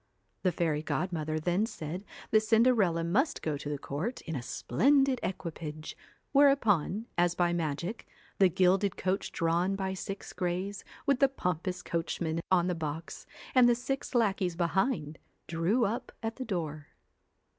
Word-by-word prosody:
The 185 - +2
fairy 160 -3 0
godmother 155 -2 -2
then 180 +7 +1
said 170 -2 -6 0.3
that 215 - +6
Cinderella 220 -6 +3
must 240 - +1
go 155 -2 0
to 145 +1 -5
the 145 - -2
court 155 - -4
in 160 - -5
a 130 - -2
splendid 270 - +2
equipage, 155 -4 -5 0.4
whereupon, 225 - +3
as 175 0 +3
by 175 -1 +2
magic, 170 +6 -3 0.3
the 190 -2 +6
gilded 185 +2 +2
coach 190 +1 -1
drawn 170 +3 +1
by 190 -1 -2
six 195 +1 -6
greys, 185 +3 -2 0.2
with 275 -2 +3
the 275 - +5
pompous 180 - -2
coachman 165 -1 -2
on 180 -2 +4
the 180 - 0
box, 160 0 -5 0.3
and 250 -2 +7
the 240 - +4
six 260 +2 -4
lackeys 195 -6 +2
behind, 170 - 0 0.3
drew 175 +9 +1
up 220 +4 -3
at 225 0 -3
the 260 - -4
door. 155 -8 -3
180 Hz, 150 wpm, -30 LUFS, 165-220 Hz, 0.4 s, and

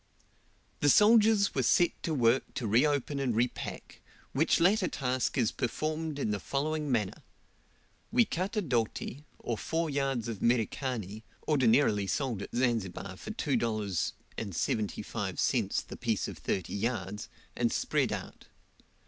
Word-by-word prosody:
The 145 - +3
soldiers 210 - +5
were 135 - +1
set 175 +7 +4
to 165 - -2
work 120 0 +2
to 120 - -2
reopen 140 +5 +2
and 130 -5 0
repack, 120 +2 -3 0.3
which 150 +5 +3
latter 185 +3 +4
task 130 -1 -1
is 110 - +2
performed 155 +5 -2
in 125 -7 -1
the 105 - -1
following 150 +4 -2
manner: 105 -6 -1 0.9
We 235 0 +5
cut 190 +2 -3
a 210 - +1
doti, 125 +1 -2
or 115 -3 -3
four 165 -1 -1
yards 135 -5 -1
of 115 -4 -5
Merikani, 115 -3 0 0.3
ordinarily 115 -7 +3
sold 120 -3 -1
at - - -6
Zanzibar 110 -6 -1
for - - -9
$2.75 105 -1 -1
the - - -9
piece - - -1
of - - -8
thirty 95 - -2
yards, 105 -2 -3 0.3
and - - +1
spread - - +1
out. - - -6
125 Hz, 130 wpm, -30 LUFS, 110-155 Hz, 0.9 s, soldiers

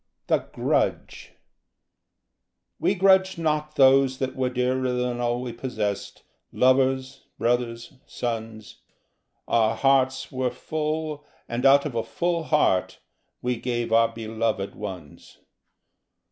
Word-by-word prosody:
The - - +2
Grudge - - -1 1.5
_We 195 - +1
grudged 190 0 +4
not 150 -2 -1
those 135 -1 +5
that 130 -1 -3
were 130 -1 0
dearer 125 +1 0
than 125 -1 -2
all 120 0 -1
we 120 -2 -5
possessed, 110 -5 -4 0.3
Lovers, 130 +1 +1
brothers, 120 0 -1
sons. 110 -2 -5 0.7
Our 115 -1 +2
hearts 135 +2 +2
were 130 -1 -1
full, 155 +3 -3 0.2
and 120 +3 +1
out 140 +1 +6
of 150 - -3
a 115 - 0
full 170 +5 -2
heart 150 - +1 0.4
We 125 -1 0
gave 120 -1 -2
our 115 0 +5
beloved 110 -3 -3
ones. 90 -8 -9
125 Hz, 115 wpm, -25 LUFS, 115-135 Hz, 1.5 s, out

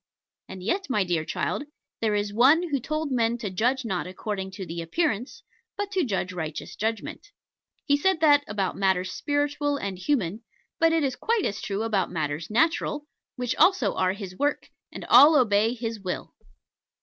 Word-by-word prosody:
And 190 -1 -8
yet, 365 - -1
my 210 -6 +2
dear 175 -3 -1
child, - - -2 0.4
there 215 -2 +1
is 205 0 -1
One 290 +10 +4
who 280 - +1
told 305 +3 -3
men 235 -2 +1
to 215 -5 -5
judge 245 +7 0
not 185 -5 -2
according 190 +1 -4
to 190 -1 -6
the 170 0 -5
appearance, 245 - -2 0.3
but 405 0 -3
to 380 -3 +1
judge 190 -7 -2
righteous 160 -4 -5
judgment. 220 - -3 0.6
He 285 - +4
said 375 +3 +1
that 290 -2 +5
about 200 -3 -2
matters 190 -2 +1
spiritual 290 0 -1
and 195 -7 -5
human: 210 - -1 0.4
but 330 0 +4
it 325 -2 +2
is 265 -2 0
quite 455 -3 0
as 200 - -3
true 200 +2 -2
about 205 -5 0
matters 155 -1 -3
natural, 295 +4 +1 0.3
which 250 -2 -2
also 325 - +4
are 185 0 +1
His 195 -2 -8
work, 290 +7 -1 0.2
and - - -8
all 290 +5 +8
obey 220 0 +2
His 225 -2 -4
will. 185 -2 -5
225 Hz, 175 wpm, -26 LUFS, 190-290 Hz, 0.6 s, all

